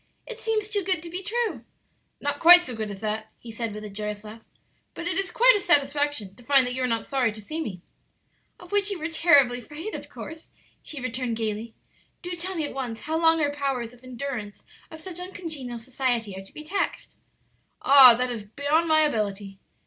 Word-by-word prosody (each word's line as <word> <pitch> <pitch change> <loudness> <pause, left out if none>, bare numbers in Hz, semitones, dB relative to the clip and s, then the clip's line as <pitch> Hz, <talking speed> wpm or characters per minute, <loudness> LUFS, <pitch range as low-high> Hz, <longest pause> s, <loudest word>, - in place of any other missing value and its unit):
"It 475 -2 -8
seems 435 -2 -1
too 410 -1 0
good 365 -3 0
to 335 - -8
be 360 +2 -4
true." 455 +3 -2 0.6
"Not 285 0 -2
quite 350 +1 +9
so 255 - -5
good 220 -1 -4
as 200 -1 -8
that," 215 0 -3
he 235 - -10
said, 225 0 -4
with 210 +1 -7
a 210 - -7
joyous 210 +1 -5
laugh, 215 +1 -10 0.5
"But 340 - -5
it 355 - -1
is 390 0 0
quite - - +6
a - - +1
satisfaction 290 - +1
to 245 - -18
find 275 0 +5
that 250 - -3
you 260 - -3
are 255 - +1
not 230 -2 -1
sorry 260 -4 +1
to 215 - -9
see 310 +10 -5
me." 185 - -6 0.8
"Of 355 - -14
which 410 0 +2
you 400 - -3
were 320 0 -4
terribly 285 -7 +4
afraid, 300 - -8
of - - -7
course," 320 0 -9 0.3
she 300 - -6
returned, 250 -2 -3
gayly. 220 0 -4 0.5
"Do 355 - -5
tell 360 +2 -4
me 320 -3 -1
at - - -6
once 245 -4 -5
how 315 +1 -3
long 325 0 +4
our 290 -1 +1
powers 270 -5 -3
of 245 +1 -19
endurance 250 -5 -6 0.3
of 320 0 -10
such 360 0 -6
uncongenial 320 -9 -5
society 240 -4 -2
are 190 - -7
to - - -13
be 305 - -9
taxed?" 390 +6 -3 0.7
"Ah, 265 -3 +9
that 250 +1 -1
is 225 -3 -5
beyond 285 +9 0
my 315 -1 +5
ability." 205 -8 -1
275 Hz, 215 wpm, -25 LUFS, 230-335 Hz, 0.8 s, quite